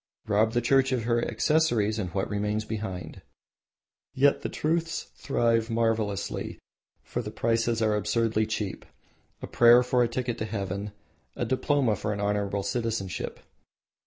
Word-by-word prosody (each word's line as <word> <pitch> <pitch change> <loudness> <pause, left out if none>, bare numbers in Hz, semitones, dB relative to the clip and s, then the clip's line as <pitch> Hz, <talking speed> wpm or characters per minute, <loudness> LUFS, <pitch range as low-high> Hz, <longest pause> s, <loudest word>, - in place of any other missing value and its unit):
Rob 110 +1 +2
the 120 - +2
Church 135 +2 +3
of 125 -3 0
her 120 0 +1
accessories 115 -3 +1
and 90 -4 -3
what 95 +2 -1
remains 105 +1 -1
behind? 105 -5 -5 0.9
Yet 140 +1 +4
the - - -3
trusts 165 +1 -1
thrive 115 -4 +1
marvelously, 110 -3 -1 0.5
for - - -3
the - - -6
prices 115 0 0
are 110 -1 +2
absurdly 110 0 +1
cheap, 105 -3 -3 0.6
a - - -1
prayer 120 +1 +6
for 125 0 +2
a 120 - +4
ticket 120 0 -3
to 110 - -1
heaven, 100 -1 -4 0.4
a - - -2
diploma 130 -3 +1
for 105 +1 -2
an 100 - -5
honourable 100 -1 -1
citizenship. 110 -2 -3
115 Hz, 145 wpm, -27 LUFS, 105-120 Hz, 0.9 s, prayer